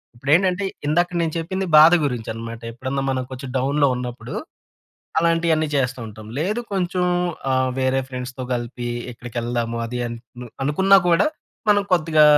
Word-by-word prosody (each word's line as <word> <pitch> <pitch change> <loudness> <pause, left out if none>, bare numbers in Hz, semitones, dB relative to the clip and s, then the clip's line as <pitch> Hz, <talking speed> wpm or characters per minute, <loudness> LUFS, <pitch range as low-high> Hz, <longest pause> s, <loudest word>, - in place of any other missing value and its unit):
ఇప్పుడేంటంటే, 180 +9 +2 0.2
ఇందాక 175 +4 +2
నేను 160 -2 -1
చెప్పింది 190 +4 -2
బాధ 160 +3 +9
గురించి 125 -5 -3
అనమాట. 115 +1 -7
ఎప్పుడన్నా 130 +3 -3
మనం 130 -1 -1
కొంచం 130 0 -6
డౌన్‌లో 140 +3 +2
ఉన్నప్పుడూ, 125 -1 -6 0.8
అలాంటియన్ని 165 -1 +2
చేస్తా 130 -1 0
ఉంటాం. 110 0 -10
లేదు 210 +9 0
కొంచెం 180 -1 0 0.5
ఆహ్, 130 0 +2
వేరే 130 0 +2
ఫ్రెండ్స్‌తో 125 0 -6
గలిపి 120 0 -3 0.2
ఎక్కడికెళ్దాము 120 0 -3
అది 125 +2 -4
అన్ 120 0 -5 0.2
మ్ 125 - -7 0.2
అనుకునా 190 +7 +5
కూడా, 170 +3 +4 0.4
మనం 205 -1 +4
కొద్దిగా 155 -3 +5
135 Hz, 140 wpm, -22 LUFS, 125-165 Hz, 0.8 s, బాధ